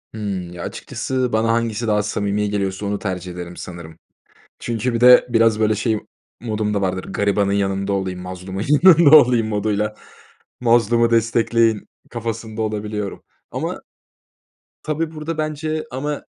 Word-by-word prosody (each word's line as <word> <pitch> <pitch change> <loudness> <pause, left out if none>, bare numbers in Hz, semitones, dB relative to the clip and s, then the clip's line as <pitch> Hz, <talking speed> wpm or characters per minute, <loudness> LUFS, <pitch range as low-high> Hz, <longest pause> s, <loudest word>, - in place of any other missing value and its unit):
Hıı. 110 - -6 0.3
Ya, 85 - -7
açıkçası 130 -2 -3
bana 110 +1 +2
hangisi 115 0 -1
daha 105 -1 +2
samimi 105 0 -1
geliyorsa 100 0 -2
onu 100 0 -2
tercih 90 -2 -4
ederim 90 0 -8
sanırım. 85 -2 -9 0.6
Çünkü 120 +1 -2
bir 115 - 0
de 125 0 +8
biraz, 115 -2 +3
böyle, 110 0 +2
şey 110 0 0 0.4
modum 110 -2 -2
da 100 - 0
vardır. 95 -1 -1
Garibanın 100 -1 0
yanında 100 0 0
olayım, 95 -2 -2
mazlumun 95 +2 -6 0.2
yanında 170 -4 +8
olayım 120 -5 +3
moduyla 105 0 -1 0.7
mazlumu 115 0 +3
destekleyin 115 -1 +2 0.2
kafasında 115 -1 -5
olabiliyorum. 105 -1 -4 0.3
Ama - - -4 1.0
tabii, 155 +1 -2
burada 160 +1 -5
bence 155 0 -3
ama 145 +3 -4
110 Hz, 135 wpm, -20 LUFS, 100-120 Hz, 1.0 s, de